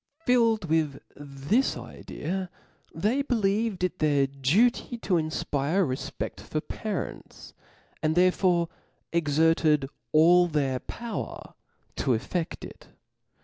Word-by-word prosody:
Filled 230 -5 +3
with 155 -3 +1 0.2
this 145 - 0
idea, 185 +2 -5 0.4
they 215 - 0
believed 215 -6 0
it 180 - -1
their 145 -3 +3
duty 170 - +1
to 210 - -2
infpire 155 +1 0
a - - 0
refpeft 140 +2 -6
for 155 - -3
parents, 205 +5 -6 0.5
and 155 0 +1
therefore 180 -1 +3 0.5
ex, 160 -4 0
erted 160 -3 +3 0.2
all 175 +3 +6
their 140 -5 0
power 230 - -6 0.4
to 125 - +2
effedt 165 +8 -4
it. - - -11
170 Hz, 110 wpm, -27 LUFS, 150-200 Hz, 0.5 s, all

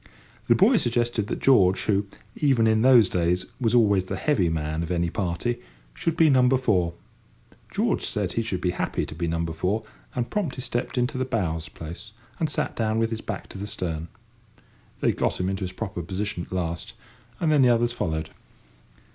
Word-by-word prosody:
The - - +5
boy - - +5
suggested 120 -3 0
that - - -4
George, 95 -9 +5
who, 100 -1 +1 0.3
even 135 -6 +3
in 110 -1 +3
those 125 -4 +7
days, 90 +1 0
was 120 -2 +2
always 100 -5 +4
the - - -4
heavy 115 - +1
man 80 0 -2
of 85 - -4
any 85 -2 0
party, 100 +4 -2 0.3
should 165 - -2
be 165 - +6
number 130 -2 +5
four. 90 -9 +1 0.8
George - - 0
said 100 -4 -1
he 115 - 0
should 100 -5 -3
be 90 - +1
happy - - -2
to - - -8
be 85 +2 -3
number 85 0 -1
four, 100 +7 -1 0.3
and 125 -1 -2
promptly 160 -11 -2
stepped 120 +1 -3
into 125 +1 0
bow's 85 - -2
place, 85 +8 -9 0.3
and 160 - +1
sat - - -2
down 110 -1 0
with 115 0 +1
his 110 -1 -3
back - - -5
to 95 - -9
the 100 - -4
stern. 85 -6 -4 0.9
They - - +3
got - - -1
him 90 +1 0
into 95 0 -2
his 90 - -5
proper 100 -2 -5
position 95 +1 -3
at - - -24
last, 85 -2 -3 0.4
and 160 -3 +2
then 150 -2 +5
the 125 - +6
others 120 0 +2
followed. 80 -8 -2
105 Hz, 190 wpm, -25 LUFS, 85-120 Hz, 0.9 s, those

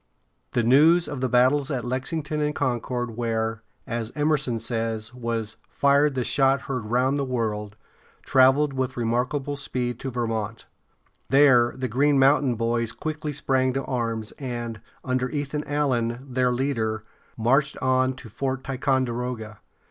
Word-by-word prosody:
The 120 - +2
news 155 +8 +5
of 145 -3 -5
the 130 - 0
battles 130 +3 +3
at 130 -5 -2
Lexington 150 +4 -2
and 150 0 0
Concord, 120 -2 -2
where, 115 -1 -1 0.2
as 115 -2 -3
Em´er 150 0 +2
son 125 -4 -1
says, 115 0 -3
was 115 -3 -3
"fired 140 0 +3
the 130 - 0
shot 135 +2 +2
heard 130 -6 -4
round 130 +5 +1
the - - 0
world," 110 -5 -2 0.5
traveled 135 +2 +4
with 130 -1 -2
remarkable 125 +5 -1
speed 125 -3 -3
to 135 - -4
Ver 120 -1 -2
mont´. 110 -1 -3 0.7
There 130 -3 +5
the 130 0 -2
Green 140 +5 +2
Mountain 135 -1 +4
Boys 115 0 0
quickly 155 -1 -4
sprang 130 -2 +1
to 135 +1 -2
arms, 115 -4 -2
and, 120 -5 -5 0.2
under 130 -1 0
Ethan 145 +1 -3
Allen, 130 -4 -1
their 125 -1 +1
leader, 115 -4 -1 0.3
marched 135 +5 +2
on 130 0 +1
to 130 -2 -11
Fort 130 +4 -3
Ticonderoga. 125 -5 -2
130 Hz, 150 wpm, -25 LUFS, 115-140 Hz, 0.7 s, news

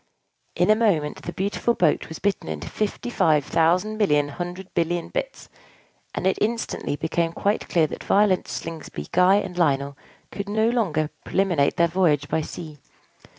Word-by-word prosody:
In - - +3
a - - +6
moment, 185 -10 +1
the 175 - -5
beautiful 200 +6 -1
boat 165 -4 +1
was 160 - -7
bitten 200 - -1
into 75 -2 -5
fifty 215 +3 -3
five 155 - +3
thousand 180 +7 +1
million 150 -8 +3
hundred 175 +5 -6
billion 170 0 -1
bits; - - -4 0.7
and - - -3
it 190 - +2
instantly 230 -8 -1
became 165 +2 -1
quite 205 +4 -1
clear 165 -2 +3
that - - -6
Violet, 200 -2 +3
Slingsby, 155 - -6
Guy, 180 +2 +5
and 195 -3 -1
Lionel 140 -3 +1 0.4
could 200 0 -5
no 220 +2 +2
longer 160 -11 0
preliminate 180 -7 +1
their 170 - +4
voyage 170 -5 +2
by 160 - +1
sea. 155 -1 -8
175 Hz, 160 wpm, -24 LUFS, 155-205 Hz, 0.7 s, a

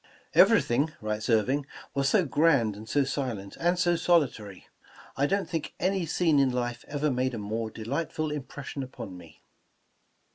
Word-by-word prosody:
''Everything,'* 140 +6 +4
writes 110 +1 -3
Irving, 125 +6 +2 0.3
''was 140 0 +1
so 190 0 +3
grand, 140 -8 +3
and 110 +2 -10
so 145 - +3
silent, 125 -8 -4
and 175 +2 +2
so 175 0 +3
solitary. 130 - 0 0.5
I 140 +1 +2
don't 200 +3 0
think 165 -3 -4
any 185 -2 0
scene 160 -2 +2
in 135 -1 +4
life 120 -1 -3
ever 145 0 -1
made 130 0 0
a - - -4
more 110 +2 -3
delightful 150 +7 -3
impression 140 -1 -6
upon 125 -7 -7
me. 85 -2 -15
135 Hz, 155 wpm, -28 LUFS, 110-155 Hz, 0.5 s, Everything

